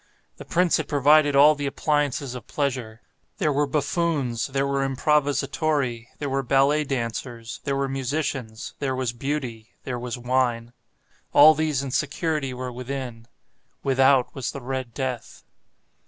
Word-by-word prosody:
The - - -10
prince 180 0 +2
had - - -3
provided 145 0 +4
all 145 +2 +7
the 145 -1 -3
appliances 145 -2 0
of 125 -4 -9
pleasure. 125 -6 -3 0.4
There 155 -7 +1
were 145 +1 +1
buffoons, 145 -4 0
there 135 +1 0
were 140 0 0
improvisatori, 140 -2 0
there 145 - -4
were 135 0 0
ballet 140 +3 +3
dancers, 115 -2 -4
there 140 - 0
were 140 0 0
musicians, 135 -4 -3
there 135 -2 -1
was 130 -2 -2
Beauty, 120 -4 -4
there 125 -2 -4
was 125 +1 -4
wine. 120 -1 0 0.6
All 155 +2 +9
these 155 -3 0
and 135 -2 -5
security 150 -1 -1
were 125 0 -5
within. 125 -2 -6 0.6
Without 135 -1 +3
was 135 -3 -3
the 140 - -6
"Red 130 -2 -4
Death." 130 -3 -4
135 Hz, 145 wpm, -24 LUFS, 125-145 Hz, 0.6 s, All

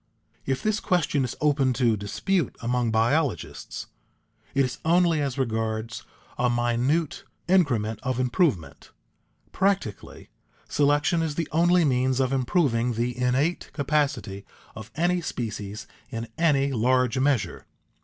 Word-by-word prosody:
If 135 -1 -1
this 215 0 +1
question 160 -6 +1
is 125 - -3
open 140 -3 +2
to 120 -2 +2
dispute 130 - -1
among 120 0 0
biologists, 120 +5 -1 0.7
it 140 -1 +4
is 125 -1 -5
only 170 -1 +3
as 140 -2 -2
regards 110 -2 -2 0.4
a 125 0 +3
minute 120 +6 0 0.2
increment 120 - +2
of 130 -1 -2
improvement. 125 - 0 0.6
Practically, 195 - -2 0.4
selection 145 +4 +2
is 160 -3 -2
the 165 -1 -2
only 175 +2 +4
means 130 -1 +1
of 130 0 +1
improving 125 -3 +1
the 120 +2 -1
innate 130 +7 0
capacity 140 -9 -1 0.3
of 110 0 -9
any 175 +2 +1
species 105 -7 -5 0.2
in 115 -2 -5
any 145 -4 +2
large 125 +2 +2
measure. 130 -9 0
130 Hz, 125 wpm, -25 LUFS, 115-155 Hz, 0.7 s, it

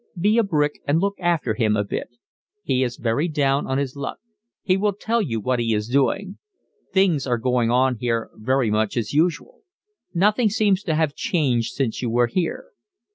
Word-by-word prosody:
Be 210 +6 +3
a - - +4
brick 150 -7 0
and 145 +3 +3
look 200 +2 -1
after 170 -10 0
him 110 -2 +1
a 105 - +1
bit. 100 - -4 0.5
He 130 - 0
is 125 -2 -1
very 120 +8 0
down 140 -3 0
on 130 - 0
his 140 -1 -2
luck. 140 - -5 0.5
He 185 - +2
will 205 +1 +1
tell 225 +4 -1
you 115 - -2
what 125 +4 -1
he 115 -2 +1
is 105 +1 -2
doing. 140 - 0 0.5
Things 180 -8 +2
are 120 -1 +1
going 125 -1 +1
on 125 +1 +2
here 115 -1 -2
very 125 +1 0
much 110 +2 0
as 115 0 -2
usual. 175 - 0 0.5
Nothing 210 +5 +2
seems 205 -3 +2
to 160 -5 0
have 155 -2 +1
changed 130 - 0
since 130 -5 -2
you 120 - -1
were 120 +1 +3
here. 170 - -3
140 Hz, 190 wpm, -22 LUFS, 120-185 Hz, 0.5 s, a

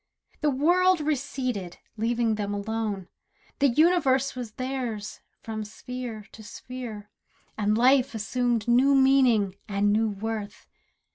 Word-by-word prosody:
The 300 - +2
world 350 +6 +3
receded, 255 - -3 0.2
leaving 230 0 0
them 205 -1 -2
alone. 205 -2 -3 0.5
The 280 - +5
universe 275 -1 +3
was 240 -4 -6
theirs, 250 -5 -4 0.2
from 220 -1 -4
sphere 230 0 -7
to 220 - -12
sphere, 220 -2 -8 0.4
And 210 0 +1
life 255 +1 +4
assumed 235 +1 -1
new 260 +4 +4
meaning, 255 -8 +4
and 205 0 +2
new 220 +1 +2
worth. 210 0 -5
235 Hz, 120 wpm, -26 LUFS, 210-265 Hz, 0.5 s, The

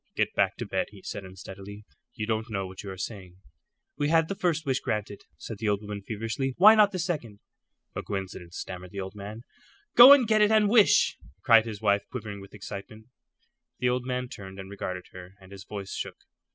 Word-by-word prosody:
"Get - - 0
back - - +1
to - - -4
bed," - - -1
he 100 -2 -15
said, 100 - -6
unsteadily. 95 +2 -10 0.3
"You 110 -4 -3
don't 110 +1 -2
know 100 -3 -2
what 95 0 -9
you 100 - -8
are 95 - -7
saying." 90 -2 -7 0.6
"We 145 0 +1
had 165 0 +3
the 195 - -2
first 170 -4 0
wish 135 -1 +1
granted," 105 -2 -3 0.2
said 110 +4 -8
the 110 - 0
old 100 +1 0
woman, 105 -1 -6
feverishly; 115 +6 -3
"why 210 +4 +9
not 210 -2 +5
the 185 - -3
second?" 155 - -3 0.6
"A - - -2
coincidence," 95 -3 -6
stammered 90 -1 -7
the 100 - -7
old 95 0 -5
man. 105 +3 -8 0.5
"Go 245 +3 +11
and 275 -5 +7
get 215 -1 +3
it 210 - +5
and 215 -1 +4
wish," 220 -2 +4 0.2
cried 115 -1 +6
his 110 -1 -7
wife, 100 -1 +3
quivering 105 -5 -6
with 100 +1 -13
excitement. 105 +2 -9 0.7
The 125 - +1
old 125 0 0
man 125 0 -2
turned 100 -6 -10
and 95 0 -8
regarded 90 -2 -5
her, 95 +1 -12
and 95 0 -16
his 100 0 -10
voice 100 -2 -7
shook. - - -5
105 Hz, 210 wpm, -27 LUFS, 95-130 Hz, 0.7 s, Go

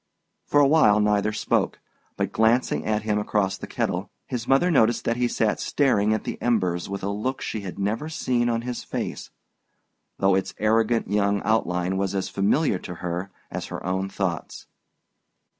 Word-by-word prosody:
For 145 - +3
a 145 - +6
while 135 -9 +5
neither 105 0 +2
spoke; 105 - 0 0.4
but - - -1
glancing 115 +3 +2
at 105 -1 0
him 105 -1 0
across 105 -2 0
the - - -7
kettle, - - -2 0.2
his 120 -2 -4
mother 155 +7 +4
noticed 120 -6 +3
that 115 - +1
he 125 0 +2
sat 110 -2 0
staring 110 -7 +2
at 110 - 0
the - - -5
embers 95 -8 0
with 100 -1 -5
a 100 - -1
look 110 +6 -2
she 110 - -4
had 95 -2 -7
never 110 +10 -2
seen 125 -6 0
on 115 0 -1
his 125 -1 -4
face, - - -4 0.9
though 95 0 +3
its 95 0 -1
arrogant 115 +2 +2
young 100 0 +2
outline 95 -4 0
was 100 0 -1
as 95 - -1
familiar 100 - +1
to 90 - -7
her 90 +2 -4 0.2
as - - -4
her - - -7
own 95 +1 -1
thoughts. 95 -4 -3
105 Hz, 175 wpm, -25 LUFS, 95-120 Hz, 0.9 s, a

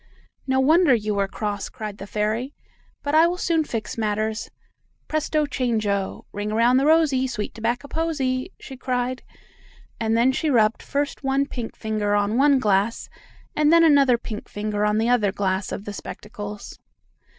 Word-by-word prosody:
"No 265 0 +2
wonder 310 +1 +5
you 210 -2 -2
were 200 -1 0
cross!" 205 0 -4
cried 215 -4 -7
the 195 - -7
fairy. 220 +7 -2 0.5
"But 285 - -2
I 320 +2 +6
will 355 +1 -2
soon 335 -3 +1
fix 225 -5 -5
matters! 215 +1 -1 0.6
Presto 310 0 0
chango! 215 -8 -1
Ring 205 +1 -4
around 235 +3 +4
the 275 +2 +2
rosey, 305 -5 +3
sweet 215 -5 -4
tobacco 235 +5 -2
posey!" 275 -6 -1
she 265 - -9
cried, 255 0 -2 0.8
and 225 0 +1
then 245 +3 +4
she 305 +4 -1
rubbed 225 -4 +3
first 285 0 -3
one 270 +1 +1
pink 240 -5 -6
finger 215 -2 -1
on 205 +1 +1
one 280 +2 +5
glass, 210 -1 +1 0.5
and 300 0 +3
then 335 0 +6
another 280 -6 +5
pink 220 -2 -7
finger 210 0 -2
on 210 0 +2
the 225 +1 +1
other 230 -5 +3
glass 190 -1 -1
of 200 - -5
the 205 - -5
spectacles. 205 0 -8
235 Hz, 165 wpm, -23 LUFS, 210-275 Hz, 0.8 s, I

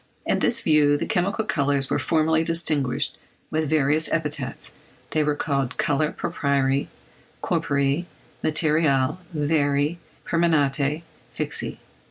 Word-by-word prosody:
In - - +1
this 235 -1 +1
view 150 -4 +4
the - - -3
chemical 200 +5 0
colours 140 -6 0
were - - +1
formerly 160 0 +2
distinguished 160 -6 +1 0.3
with 155 -1 -1
various 155 +1 +2
epithets; 150 -5 -3 0.4
they 155 - +2
were 150 0 0
called 140 -3 -2
colores 150 +2 0
proprii, 140 -1 0 0.6
corporei, 140 +4 0 0.4
materiales, 150 -3 +2
veri, 145 0 +1 0.3
permanentes, 150 -2 +1 0.3
fixi. - - -2
150 Hz, 110 wpm, -24 LUFS, 140-160 Hz, 0.6 s, view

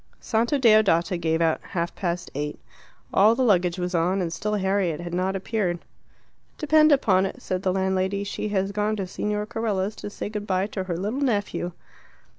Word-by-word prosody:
Santa 235 +5 +1
Deodata 215 -7 +4
gave 160 -1 0
out 160 -1 +1
half 170 -2 -3
past 175 -1 -3
eight. 150 +1 -4 0.5
All 215 +4 +5
the 260 - +1
luggage 180 -6 +3
was 180 0 -3
on, 180 +3 +1
and 170 -3 -2
still 210 +6 -2
Harriet 190 -5 0
had 175 0 -6
not 185 +2 0
appeared. 195 -2 -1 0.8
"Depend 305 +1 +4
upon 195 -9 +4
it," - - -8
said 185 -1 -3
the 190 - +1
landlady, 190 +1 0
"she 205 +1 -4
has 195 -1 0
gone 210 +1 0
to 195 -3 -3
Signor 210 +3 -2
Carella's 215 -3 -2
to - - -6
say 205 - -5
good 210 0 -5
bye 185 0 +1
to 195 -2 -4
her 175 -3 -3
little 210 +9 -2
nephew." 205 -8 -1
195 Hz, 185 wpm, -25 LUFS, 180-210 Hz, 0.8 s, All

